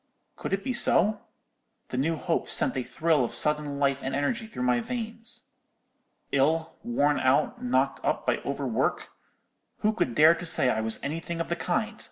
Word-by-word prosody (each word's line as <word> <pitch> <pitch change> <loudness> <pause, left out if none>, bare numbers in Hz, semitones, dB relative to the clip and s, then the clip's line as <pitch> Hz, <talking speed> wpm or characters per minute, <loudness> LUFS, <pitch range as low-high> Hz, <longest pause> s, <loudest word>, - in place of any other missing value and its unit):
Could - - -6
it 195 0 -1
be 260 - -2
so? 215 -3 +4 0.7
The - - -4
new 160 +5 +1
hope 165 +2 -2
sent - - +2
a 130 - 0
thrill 145 +4 +1
of 120 - 0
sudden 150 -2 +1
life 140 -1 +1
and 135 0 -3
energy 220 - -1
through 125 - -5
my 125 -1 +2
veins. 230 - -5 0.8
Ill—worn 155 - +1
out, 150 - +1
knocked 250 - 0
up - - -1
by - - +1
over - - -4
work? - - -1 0.7
Who 215 0 +2
could 125 - -1
dare 155 +2 +7
to 175 - -7
say 130 -5 +3
I 110 - -1
was 110 0 +1
any 150 +3 -3
thing 170 0 -5
of 165 - -3
the 170 - 0
kind? 215 +6 -2
160 Hz, 185 wpm, -27 LUFS, 135-215 Hz, 0.8 s, dare